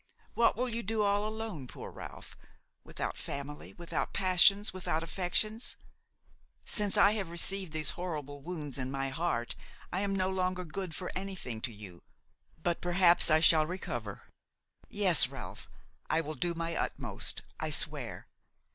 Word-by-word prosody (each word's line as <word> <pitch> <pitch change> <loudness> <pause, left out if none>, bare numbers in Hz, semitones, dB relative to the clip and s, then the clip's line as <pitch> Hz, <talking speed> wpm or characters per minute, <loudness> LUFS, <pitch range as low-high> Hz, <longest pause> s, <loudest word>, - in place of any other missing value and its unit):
What 235 - +4
will 250 +2 +1
you 235 -1 -2
do 220 0 0
all 205 +1 +2
alone, 215 - -5
poor - - -8
Ralph, - - -9 0.5
without - - -4
family, 140 +1 -6
without 170 -1 -3
passions, 195 +2 +5
without 180 -3 -1
affections? 195 +7 -1 0.9
Since 205 -3 +3
I 200 - +7
have 205 -5 -2
received 185 +1 0
these 155 -2 -1
horrible 150 -5 -5
wounds 150 -4 -4
in 130 0 -2
my 135 0 -1
heart 135 -5 -1 0.4
I 185 - +1
am 200 -1 0
no 190 0 +1
longer 185 -1 -1
good 175 +1 -4
for 180 - -4
anything 185 - -4
to 120 - -1
you; 100 -5 -9 0.6
but 175 -1 0
perhaps 175 -1 +5
I 155 0 +5
shall 155 -2 +7
recover. 120 - -5 0.7
Yes, - - +5
Ralph, - - -8 0.4
I - - +3
will 155 -1 -3
do 170 +4 -1
my 165 0 -2
utmost, - - -1 0.2
I - - -2
swear. - - -1
175 Hz, 150 wpm, -32 LUFS, 150-195 Hz, 0.9 s, I